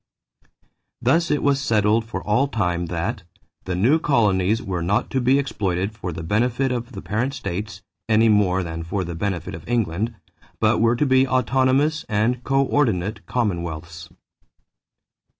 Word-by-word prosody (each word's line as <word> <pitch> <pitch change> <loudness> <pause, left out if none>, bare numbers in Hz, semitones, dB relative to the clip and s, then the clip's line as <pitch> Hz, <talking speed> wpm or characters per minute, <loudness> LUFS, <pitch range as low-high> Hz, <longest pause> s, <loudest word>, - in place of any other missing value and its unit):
Thus 160 +8 +2
it 150 - 0
was 140 -1 +2
settled 110 -3 +2
for 115 - -5
all 110 +7 +2
time 90 -9 -1
that 90 +6 -3 0.4
"the 95 - -2
new 125 - +3
colonies 105 -7 +2
were 95 -7 -3
not 95 +5 0
to 130 - 0
be 130 +3 +4
exploited 100 -8 -1
for 95 -5 -5
the 80 0 -6
benefit 125 +8 0
of 120 0 -4
the 95 - -8
parent 125 +7 -1
states 100 -2 -5 0.3
(any 110 +1 +4
more 95 -3 +3
than 80 -1 -5
for 90 +4 -3
the 85 -1 -5
benefit 90 -1 -3
of - - -9
England) 110 -1 -1 0.4
but - - +2
were 115 +1 +3
to 135 - +1
be 130 0 +4
autonomous 130 +4 +2
and 115 +4 0
coördinate 120 -8 +1
commonwealths." 85 -6 -3
110 Hz, 150 wpm, -22 LUFS, 90-130 Hz, 0.4 s, be